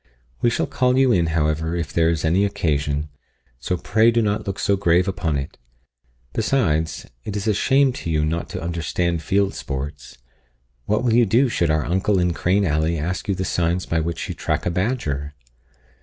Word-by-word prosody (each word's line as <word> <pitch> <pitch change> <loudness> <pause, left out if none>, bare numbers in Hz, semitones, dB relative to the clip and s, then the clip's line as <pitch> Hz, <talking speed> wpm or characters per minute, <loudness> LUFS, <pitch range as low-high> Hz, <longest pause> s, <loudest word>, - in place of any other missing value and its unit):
We 120 - +4
shall - - 0
call 125 0 +1
you 135 -1 +4
in, 85 -6 +2
however, 80 +1 0
if 85 -5 -3
there 80 -1 +3
is 80 -1 -1
any 90 +5 +3
occasion; 75 -6 -1 0.5
so 90 - -2
pray 110 +5 +3
do 115 0 +2
not 105 0 -1
look 95 0 -3
so 100 - +1
grave 90 -1 +2
upon 90 -5 -1
it. 70 -2 -6 0.7
Besides, 80 - 0 0.2
it 105 - -5
is 100 0 -3
a 110 - +2
shame 135 +5 +3
to - - -4
you 75 -1 +1
not 80 +1 -2
to - - -5
understand 85 0 -1
field 100 +4 +1
sports 70 +1 -6 0.7
What 105 +3 0
will 120 -3 +2
you 120 -1 +4
do 125 +7 +3
should 85 -7 0
our 75 -1 +1
uncle 95 +4 +1
in 90 -1 +1
Crane 95 +4 +1
Alley 80 +1 +1
ask 85 +5 -3
you 100 - +1
the 95 - -3
signs 85 +1 0
by 80 - 0
which 85 +1 -3
you - - -4
track - - -2
a 90 - +1
badger?" 75 - -2
85 Hz, 195 wpm, -22 LUFS, 80-100 Hz, 0.7 s, We